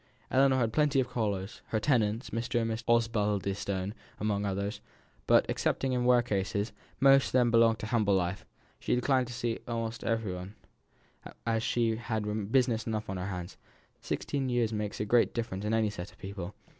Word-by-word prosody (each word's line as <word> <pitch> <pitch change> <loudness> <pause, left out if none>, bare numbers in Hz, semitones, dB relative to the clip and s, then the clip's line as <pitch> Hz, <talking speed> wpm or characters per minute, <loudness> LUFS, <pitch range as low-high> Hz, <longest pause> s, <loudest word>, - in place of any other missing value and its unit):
Ellinor 135 0 +4
had 115 -3 +1
plenty 145 -1 +3
of 130 - +1
callers 105 -6 -3
(her 110 - 0
tenants, 115 -2 +1
Mr. 115 +1 -1
and 115 -1 0
Mrs. 110 +1 -4
Osbaldistone 100 -4 0 0.3
among 105 -1 0
others), 100 +2 -3 0.5
but, - - +5
excepting 135 -1 0
in 125 -1 +1
rare 125 -1 +5
cases 100 -1 -1 0.3
most 135 0 +6
of - - -7
them 125 -2 +4
belonged 115 -1 +5
to - - -6
humble 105 -3 +2
life 90 +1 -1 0.4
she - - 0
declined 130 0 +2
to 125 - -7
see 120 -1 -2
every 115 -3 -2
one, 90 +3 -7 0.9
as 115 -1 +1
she 115 -1 +1
had 110 -2 -3
business 120 -4 +2
enough 110 -2 -2
on 95 - -3
her 90 +1 -3
hands: 90 -1 -6 0.4
sixteen 135 -2 -2
years 120 -3 +1
makes 105 -1 -3
a 105 - -1
great 120 +2 +3
difference 105 -4 -3
in 105 - 0
any 110 -2 +2
set 90 -2 -7
of - - -22
people. 95 -1 -7
110 Hz, 180 wpm, -30 LUFS, 100-120 Hz, 0.9 s, most